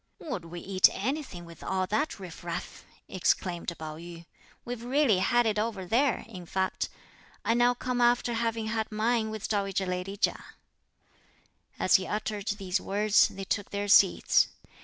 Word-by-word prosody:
"Would 250 - -5
we 170 +1 -8
eat 190 -1 +5
anything 245 - -3
with 170 0 -13
all 190 -1 0
that 215 +7 -1
riff 180 -4 -9
raff?" 170 -1 -6 0.2
exclaimed 180 -1 0
Pao 155 -1 -7
yü; 170 0 -10 0.4
"we've 245 -1 -5
really 250 -5 +3
had 240 +5 +3
it 215 -1 +1
over 210 -4 -2
there; 245 +7 +1
in 185 -6 -10
fact, 190 +1 -1 0.6
I 230 - +3
now 245 +1 +3
come 250 0 -2
after 240 0 +3
having 230 -1 -1
had 220 0 -2
mine 220 +1 +1
with 215 -1 -4
dowager 195 -2 0
lady 180 +2 -3
Chia." - - 0 1.3
As 185 - +5
he 190 - -5
uttered 210 -1 -3
these 195 -2 -1
words, 205 +1 +3
they 195 - -8
took 205 +1 -2
their 205 0 -3
seats. 195 -2 +5
205 Hz, 160 wpm, -29 LUFS, 185-230 Hz, 1.3 s, eat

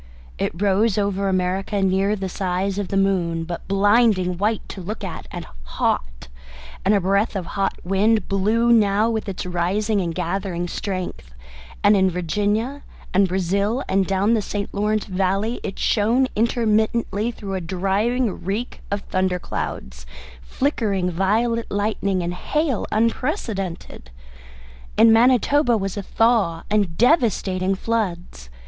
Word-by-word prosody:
It 170 - -2
rose 205 +1 +2
over 200 -1 0
America 190 +2 -1
near 195 +2 +2
the 190 -2 -4
size 190 +1 -2
of 200 - -2
the 195 - -1
moon, 175 -4 +1
but 170 +1 -6
blinding 195 -2 +3
white 215 +2 0
to 190 - -7
look 210 +4 -6
at, 180 -5 -6
and - - -7 0.2
hot; - - -2 0.6
and 210 - +3
a - - +3
breath 200 +4 +1
of 190 -3 -2
hot 195 +1 -2
wind 210 +4 +2
blew 215 +4 +2
now 215 0 +3
with 220 -2 -3
its 190 - -5
rising 195 +4 0
and 170 -2 -3
gathering 175 0 -2
strength, 180 - -5 0.5
and 205 +1 +6
in 190 -1 +3
Virginia, 205 - -1 0.3
and 195 +1 +4
Brazil, 200 +7 0
and 190 -1 +1
down 195 +3 +2
the 220 - +2
St. 200 0 -4
Lawrence 210 +1 0
valley, 195 +4 -1
it 195 - -5
shone 235 +5 +2
intermittently 220 -1 +1
through 205 -4 -6
a 190 - -2
driving 195 +6 -1
reek 205 +7 -3
of 200 0 -2
thunder 185 -2 -1
clouds, 65 - -6 0.3
flickering 200 - -1
violet 225 +6 0
lightning, 200 -2 -1
and 175 +1 -2
hail 295 - -1
unprecedented. 215 - -2 0.9
In 225 0 +7
Manitoba 245 +2 +4
was 195 -2 -3
a 205 - -3
thaw 210 -6 +1
and 200 -6 +1
devastating 200 - +2
floods. 180 - -3
200 Hz, 140 wpm, -22 LUFS, 185-220 Hz, 0.9 s, In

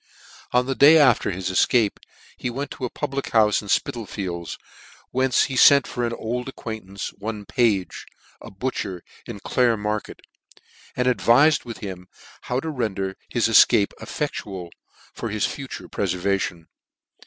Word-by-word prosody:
On 125 0 +3
the 135 - -1
day 145 +4 +7
after 130 -9 +4
his 95 -1 -3
efcape 105 +3 +2 0.4
he - - -4
went 135 +3 -5
to 130 - -5
a - - -3
public 140 +3 -4
houfe 105 -2 +3
in 105 - -11
Spitalfiekis, 95 -6 -2 0.5
whence 130 0 +2
he 135 - -3
fent 140 +1 +7
for 120 - -4
an 115 - -4
old 125 +3 -4
acquaintance, 110 -6 -6
one 105 0 -5
Pase, 105 -6 0 0.4
a - - -10
butcher, 95 -4 -4 0.2
in 100 - -7
Clare 120 -3 +2
market, 105 +1 -4 0.8
and 125 0 +1
advifed 135 +4 +4
with 115 -2 -7
him 95 -3 -7 0.3
how 125 - -2
to 160 - -4
render 100 -8 -2
his 120 -2 +1
efcape 105 -2 +5
effectual 95 - -5 0.4
for - - -5
his 105 0 0
future 135 -1 -6
prefervation. 90 -2 -2
110 Hz, 145 wpm, -23 LUFS, 100-125 Hz, 0.8 s, day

